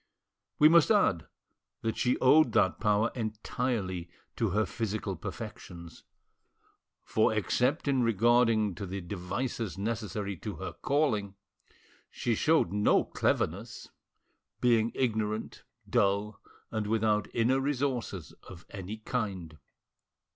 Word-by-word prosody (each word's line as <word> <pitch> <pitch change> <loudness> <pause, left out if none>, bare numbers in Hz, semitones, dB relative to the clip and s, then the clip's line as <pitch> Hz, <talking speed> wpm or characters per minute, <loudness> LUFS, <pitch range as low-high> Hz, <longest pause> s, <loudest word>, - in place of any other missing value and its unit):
We 150 - +7
must 165 -1 +5
add 100 - +3 0.6
that 110 -1 -1
she 125 - +1
owed 130 -1 +5
that 95 - +2
power 105 +1 +2
entirely 110 -5 -3 0.3
to 115 -3 0
her 105 +3 +1
physical 105 -3 -3
perfections, 85 0 -9 1.0
for 110 - +2
except 125 - 0
in 135 -2 +2
regard 120 +2 +4
to 110 -3 0
the 95 +2 -4
devices 100 +4 -4
necessary 105 -2 -3
to - - -6
her - - -6
calling, 110 -9 0 0.7
she 120 - -1
showed 150 - +2
no 105 0 +3
cleverness, - - -2 0.7
being 115 -2 +3
ignorant, 110 -4 -2 0.2
dull 100 +1 +1 0.3
and 110 -2 -2
without 105 -1 +1
inner 120 +3 +2
resources 130 - -2 0.2
of 90 -2 -12
any 100 +1 -6
kind. 100 -9 -4
110 Hz, 110 wpm, -30 LUFS, 100-120 Hz, 1.0 s, We